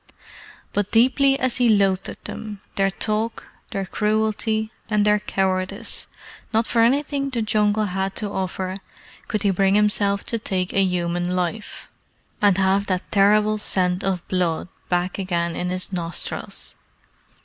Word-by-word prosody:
But 205 Hz, -1 st, 0 dB
deeply 270 Hz, +4 st, +4 dB
as 255 Hz, -2 st, +1 dB
he 245 Hz, -2 st, +4 dB
loathed 195 Hz, -3 st, +1 dB
them, 210 Hz, -2 st, -6 dB, 0.2 s
their 195 Hz, 0 st, +2 dB
talk, 215 Hz, +3 st, -2 dB, 0.2 s
their 195 Hz, -1 st, -3 dB
cruelty, 215 Hz, +2 st, 0 dB, 0.2 s
and 210 Hz, -1 st, +2 dB
their 210 Hz, 0 st, +4 dB
cowardice, 190 Hz, +2 st, -2 dB, 0.4 s
not 225 Hz, +1 st, +2 dB
for 230 Hz, -, +2 dB
anything 275 Hz, +3 st, +2 dB
the 235 Hz, -4 st, -1 dB
Jungle 215 Hz, 0 st, +2 dB
had 195 Hz, 0 st, -2 dB
to 210 Hz, -3 st, -3 dB
offer 190 Hz, 0 st, -3 dB, 0.5 s
could 215 Hz, -3 st, -2 dB
he 200 Hz, -, +3 dB
bring 195 Hz, +1 st, +2 dB
himself 205 Hz, -1 st, +2 dB
to 230 Hz, -, -2 dB
take 185 Hz, -3 st, -2 dB
a 195 Hz, -, +3 dB
human 175 Hz, -1 st, -1 dB
life, 185 Hz, +4 st, -3 dB, 0.5 s
and 200 Hz, -3 st, +4 dB
have 195 Hz, +1 st, +2 dB
that 185 Hz, -1 st, -2 dB
terrible 210 Hz, +1 st, +4 dB
scent 180 Hz, -2 st, +3 dB
of 190 Hz, -3 st, -2 dB
blood 180 Hz, -2 st, -1 dB, 0.2 s
back 180 Hz, +2 st, 0 dB
again 170 Hz, -3 st, -1 dB
in 180 Hz, -, -2 dB
his 185 Hz, +2 st, -2 dB
nostrils. 170 Hz, -1 st, -4 dB
200 Hz, 145 wpm, -22 LUFS, 185-215 Hz, 0.5 s, deeply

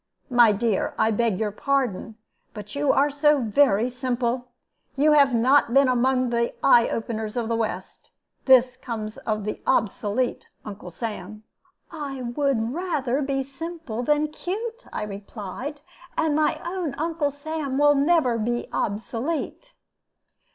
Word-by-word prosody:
My 240 Hz, -3 st, +6 dB
dear, 210 Hz, -1 st, 0 dB
I 220 Hz, -, +3 dB
beg 225 Hz, -2 st, +1 dB
your 215 Hz, 0 st, -1 dB
pardon, 235 Hz, -3 st, -1 dB, 0.4 s
but 210 Hz, -1 st, -8 dB
you 285 Hz, -1 st, +2 dB
are 285 Hz, +1 st, +3 dB
so 295 Hz, +1 st, +3 dB
very 235 Hz, -1 st, +3 dB
simple! 250 Hz, -1 st, -2 dB, 0.5 s
You 295 Hz, +3 st, +4 dB
have 280 Hz, -4 st, +5 dB
not 250 Hz, +1 st, +3 dB
been 275 Hz, 0 st, +6 dB
among 255 Hz, 0 st, +2 dB
the 235 Hz, 0 st, 0 dB
eye 240 Hz, -4 st, +6 dB
openers 220 Hz, 0 st, -3 dB
of 235 Hz, -2 st, -1 dB
the 230 Hz, -, 0 dB
west. 225 Hz, -1 st, -4 dB, 0.4 s
This 255 Hz, -1 st, +5 dB
comes 220 Hz, -4 st, -6 dB
of 215 Hz, -1 st, -3 dB
the 210 Hz, -, -4 dB
obsolete 225 Hz, +1 st, 0 dB, 0.2 s
Uncle 200 Hz, -3 st, -8 dB
Sam." 210 Hz, +2 st, -6 dB, 0.5 s
"I 280 Hz, -5 st, -5 dB
would 240 Hz, -2 st, 0 dB
rather 295 Hz, -6 st, -1 dB
be 270 Hz, -1 st, -1 dB
simple 280 Hz, -3 st, -6 dB
than 295 Hz, +4 st, +1 dB
'cute!'" 445 Hz, +9 st, -5 dB
I -, -, -3 dB
replied; 210 Hz, +7 st, -7 dB, 0.4 s
"and 315 Hz, -2 st, +1 dB
my 305 Hz, 0 st, +1 dB
own 345 Hz, -5 st, -3 dB
Uncle 320 Hz, -1 st, -1 dB
Sam 285 Hz, -1 st, -4 dB
will 290 Hz, 0 st, +5 dB
be 275 Hz, -, +1 dB
never 280 Hz, -8 st, +2 dB, 0.3 s
obsolete." 260 Hz, -, -3 dB
255 Hz, 140 wpm, -24 LUFS, 225-290 Hz, 0.5 s, My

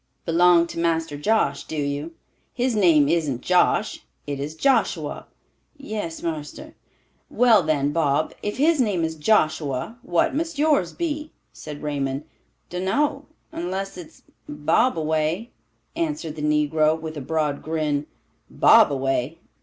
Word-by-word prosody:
"Belong 170 Hz, 0 st, +5 dB
to 170 Hz, -, -7 dB
Master 165 Hz, -2 st, 0 dB
Josh, 215 Hz, +10 st, +1 dB
do -, -, -6 dB
you? 145 Hz, +3 st, -3 dB, 0.4 s
His 250 Hz, -1 st, 0 dB
name 165 Hz, -8 st, +4 dB
isn't 150 Hz, -6 st, 0 dB
Josh, 180 Hz, +4 st, +1 dB, 0.2 s
it 140 Hz, -1 st, -4 dB
is 145 Hz, +3 st, -5 dB
Joshua." 270 Hz, +11 st, 0 dB, 0.5 s
"Yes, 215 Hz, -11 st, -5 dB
marster." 155 Hz, -3 st, -5 dB, 0.6 s
"Well, 235 Hz, -5 st, +5 dB
then, 145 Hz, -3 st, 0 dB
Bob, 150 Hz, -1 st, 0 dB
if 205 Hz, -, -4 dB
his 305 Hz, +1 st, +3 dB
name 200 Hz, -8 st, 0 dB
is 160 Hz, 0 st, -1 dB
Joshua, 155 Hz, -, 0 dB
what 175 Hz, -1 st, +1 dB
must 325 Hz, +1 st, -3 dB
yours 290 Hz, -, +2 dB
be?" 305 Hz, -2 st, -4 dB, 0.2 s
said 150 Hz, 0 st, -9 dB
Raymond. 140 Hz, -1 st, -2 dB, 0.5 s
"Dun 180 Hz, +1 st, -3 dB
know, 280 Hz, +7 st, 0 dB, 0.3 s
unless 190 Hz, +3 st, -4 dB
it's 175 Hz, -3 st, -12 dB, 0.3 s
Bobaway," 160 Hz, -, 0 dB, 0.5 s
answered 305 Hz, -, -3 dB
the 155 Hz, -, -7 dB
negro, 150 Hz, +1 st, +2 dB
with 160 Hz, 0 st, -7 dB
a 145 Hz, -, -5 dB
broad 150 Hz, 0 st, -1 dB
grin. 155 Hz, -2 st, -2 dB, 0.4 s
"Bobaway! 135 Hz, +1 st, +3 dB
160 Hz, 130 wpm, -23 LUFS, 150-210 Hz, 0.6 s, Belong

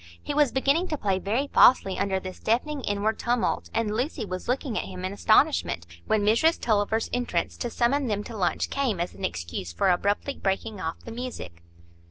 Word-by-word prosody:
He 290 Hz, -, -4 dB
was 290 Hz, -3 st, +3 dB
beginning 280 Hz, +7 st, +2 dB
to 305 Hz, -, -2 dB
play 195 Hz, -6 st, 0 dB
very 225 Hz, +9 st, 0 dB
falsely 195 Hz, -6 st, +5 dB
under 195 Hz, -1 st, 0 dB
this 185 Hz, 0 st, -8 dB
deafening 275 Hz, +6 st, 0 dB
inward 205 Hz, 0 st, -1 dB
tumult, 240 Hz, 0 st, 0 dB
and 225 Hz, -2 st, 0 dB
Lucy 250 Hz, 0 st, -2 dB
was 185 Hz, -1 st, -6 dB
looking 250 Hz, -1 st, -1 dB
at -, -, -1 dB
him 185 Hz, -1 st, -6 dB
in 190 Hz, -, -3 dB
astonishment, 215 Hz, -, +2 dB, 0.2 s
when 215 Hz, -1 st, +2 dB
Mrs 235 Hz, +11 st, +3 dB
Tulliver's 220 Hz, 0 st, +1 dB
entrance 245 Hz, 0 st, -1 dB
to 240 Hz, -, -3 dB
summon 255 Hz, +4 st, +1 dB
them 205 Hz, -2 st, -1 dB
to 230 Hz, -, -8 dB
lunch 185 Hz, -4 st, 0 dB
came 255 Hz, -10 st, 0 dB
as 175 Hz, +1 st, -2 dB
an -, -, -11 dB
excuse 85 Hz, 0 st, -4 dB
for 135 Hz, -, +2 dB
abruptly 205 Hz, +9 st, 0 dB
breaking 195 Hz, +1 st, -2 dB
off 160 Hz, +1 st, -3 dB
the 230 Hz, -, -7 dB
music. 230 Hz, -, -7 dB
220 Hz, 195 wpm, -26 LUFS, 190-255 Hz, 0.2 s, falsely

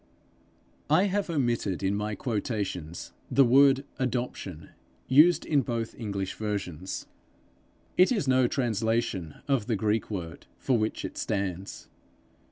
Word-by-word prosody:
I 185 Hz, -, +5 dB
have 200 Hz, -1 st, 0 dB
omitted 120 Hz, -, 0 dB
in 95 Hz, +1 st, +1 dB
my 105 Hz, +1 st, -2 dB
quotations 100 Hz, -, -3 dB, 0.2 s
the 135 Hz, -, +5 dB
word 135 Hz, +2 st, +5 dB
adoption 120 Hz, -10 st, -3 dB, 0.4 s
used 155 Hz, +7 st, +5 dB
in 145 Hz, -3 st, +3 dB
both 115 Hz, -2 st, -3 dB
English 100 Hz, -4 st, -4 dB
versions: 95 Hz, -5 st, -4 dB, 0.9 s
it 185 Hz, +5 st, +6 dB
is 205 Hz, -, 0 dB
no 130 Hz, -1 st, +4 dB
translation 115 Hz, -, -1 dB
of 135 Hz, -6 st, +1 dB
the 115 Hz, -, +1 dB
Greek 110 Hz, +2 st, 0 dB
word 85 Hz, -6 st, -6 dB
for 130 Hz, -, +1 dB
which 110 Hz, -1 st, -1 dB
it -, -, -6 dB
stands. 95 Hz, -2 st, -3 dB
115 Hz, 125 wpm, -28 LUFS, 100-130 Hz, 0.9 s, it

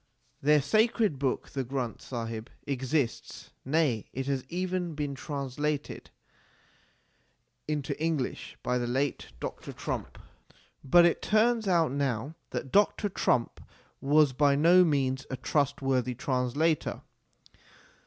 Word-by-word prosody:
Their 150 Hz, 0 st, +4 dB
sacred 215 Hz, -, +2 dB
book 135 Hz, -2 st, -1 dB
the 135 Hz, -, -2 dB
Granth 125 Hz, -3 st, -4 dB
Sahib 115 Hz, -1 st, -5 dB, 0.2 s
exists, 135 Hz, -2 st, -2 dB
nay 135 Hz, -6 st, +1 dB
it 135 Hz, +1 st, -3 dB
has 135 Hz, -2 st, -1 dB
even 180 Hz, -2 st, -2 dB
been 145 Hz, -1 st, -2 dB
translated 140 Hz, +1 st, -4 dB, 1.6 s
into 150 Hz, -3 st, -2 dB
English 160 Hz, -6 st, -2 dB
by 125 Hz, 0 st, 0 dB
the 120 Hz, -, -2 dB
late 135 Hz, +3 st, -1 dB
Dr. -, -, -6 dB
Trumpp. -, -, -5 dB, 0.6 s
But 170 Hz, +6 st, +6 dB
it 170 Hz, -, +2 dB
turns 220 Hz, 0 st, +2 dB
out 170 Hz, -6 st, +3 dB
now 135 Hz, 0 st, -1 dB, 0.2 s
that 130 Hz, +1 st, -5 dB
Dr. 205 Hz, 0 st, +3 dB
Trumpp 125 Hz, -9 st, 0 dB, 0.4 s
was 145 Hz, 0 st, +4 dB
by 140 Hz, +1 st, +3 dB
no 170 Hz, +5 st, +6 dB
means 135 Hz, -4 st, 0 dB
a 130 Hz, -, -4 dB
trustworthy 135 Hz, -3 st, 0 dB
translator. 130 Hz, +5 st, 0 dB
140 Hz, 115 wpm, -29 LUFS, 130-160 Hz, 1.6 s, But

